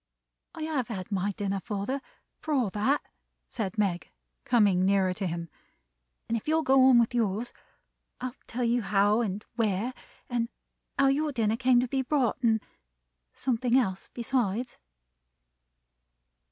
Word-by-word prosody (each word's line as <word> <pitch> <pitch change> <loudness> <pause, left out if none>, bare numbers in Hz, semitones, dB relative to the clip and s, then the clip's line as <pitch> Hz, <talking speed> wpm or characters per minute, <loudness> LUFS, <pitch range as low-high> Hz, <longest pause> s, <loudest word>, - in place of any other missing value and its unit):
"I 320 - -5
have 295 -7 -1
had 195 -4 -6
my 200 +1 0
dinner, 195 0 -2
father, 210 +7 -3 0.4
for 310 -1 -1
all 240 -8 +1
that," 220 +9 +1 0.4
said 205 -3 -4
Meg, 185 -5 0 0.4
coming 200 -6 +4
nearer 190 -1 +3
to 190 0 -3
him. 170 0 -4 0.8
"And 230 - 0
if 230 - -4
you'll 320 +1 +2
go 265 -1 +5
on 260 -2 +7
with 235 0 +3
yours, 225 0 -1 0.7
I'll 255 -1 -4
tell 245 +2 -3
you 235 +1 +2
how 205 +2 +3
and 205 -2 -3
where; 220 +2 0 0.3
and 235 -2 -1 0.5
how 275 -1 +5
your 295 +2 +1
dinner 225 -4 +1
came 250 0 +4
to 250 - -1
be 265 +2 0
brought; 260 -2 0
and 225 -3 +3 0.7
something 250 -1 +1
else 190 -7 -1
besides." 240 -2 -1
230 Hz, 145 wpm, -28 LUFS, 200-255 Hz, 0.8 s, on